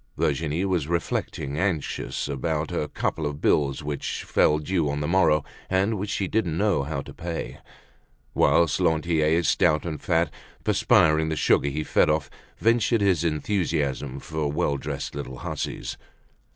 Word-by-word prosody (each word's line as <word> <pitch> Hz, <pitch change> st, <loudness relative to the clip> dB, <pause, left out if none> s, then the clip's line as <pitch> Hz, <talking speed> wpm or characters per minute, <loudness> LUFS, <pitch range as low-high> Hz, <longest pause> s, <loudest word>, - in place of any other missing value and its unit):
Virginie 80 Hz, +4 st, 0 dB
was 90 Hz, -7 st, 0 dB
reflecting, 80 Hz, -3 st, -2 dB
anxious 90 Hz, -8 st, -2 dB
about 75 Hz, +3 st, -2 dB
a 80 Hz, -4 st, -1 dB
couple 80 Hz, -, -2 dB
of 75 Hz, 0 st, -5 dB
bills 70 Hz, -1 st, +1 dB
which 75 Hz, -1 st, -3 dB
fell 75 Hz, -, +3 dB
due 80 Hz, 0 st, 0 dB
on 70 Hz, +1 st, -2 dB
the 75 Hz, -, -2 dB
morrow 85 Hz, -5 st, +3 dB, 0.3 s
and 95 Hz, +4 st, +2 dB
which 100 Hz, +1 st, -3 dB
she 100 Hz, -, -1 dB
didn't 90 Hz, -7 st, 0 dB
know 100 Hz, -5 st, +2 dB
how 70 Hz, 0 st, -3 dB
to -, -, -11 dB
pay; 85 Hz, -1 st, -5 dB, 0.7 s
whilst 85 Hz, +1 st, +3 dB
Lantier, 80 Hz, -1 st, +2 dB
stout 80 Hz, -2 st, +2 dB
and 80 Hz, -4 st, -4 dB
fat, -, -, +1 dB, 0.3 s
perspiring 80 Hz, 0 st, +3 dB
the 80 Hz, -, -1 dB
sugar 70 Hz, -1 st, +3 dB
he 75 Hz, +3 st, -2 dB
fed -, -, +3 dB
off, 75 Hz, -1 st, 0 dB, 0.3 s
ventured 115 Hz, -1 st, +2 dB
his 95 Hz, -5 st, +2 dB
enthusiasm 75 Hz, -5 st, -1 dB
for 75 Hz, 0 st, -3 dB
well 75 Hz, -2 st, 0 dB
dressed -, -, -5 dB
little 70 Hz, -3 st, -6 dB
hussies. -, -, -4 dB
80 Hz, 150 wpm, -25 LUFS, 75-90 Hz, 0.7 s, fell